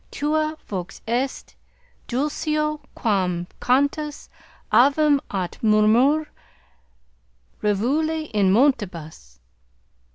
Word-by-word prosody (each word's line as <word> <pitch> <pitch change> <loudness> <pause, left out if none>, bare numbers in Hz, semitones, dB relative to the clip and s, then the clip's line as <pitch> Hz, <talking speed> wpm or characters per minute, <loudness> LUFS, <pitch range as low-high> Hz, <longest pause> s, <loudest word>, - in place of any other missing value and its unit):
Tua 310 +1 -1
vox 190 -2 -6
est 250 +4 -2 0.5
dulcior 305 +3 -1
quam 185 -5 0 0.2
cantus 285 +4 0 0.4
avium 285 +2 +4
aut 185 -3 -4
murmur 225 +8 +4 1.4
rivuli 295 +10 0
in 200 -3 +3
montibus. 180 - 0
255 Hz, 70 wpm, -23 LUFS, 205-300 Hz, 1.4 s, avium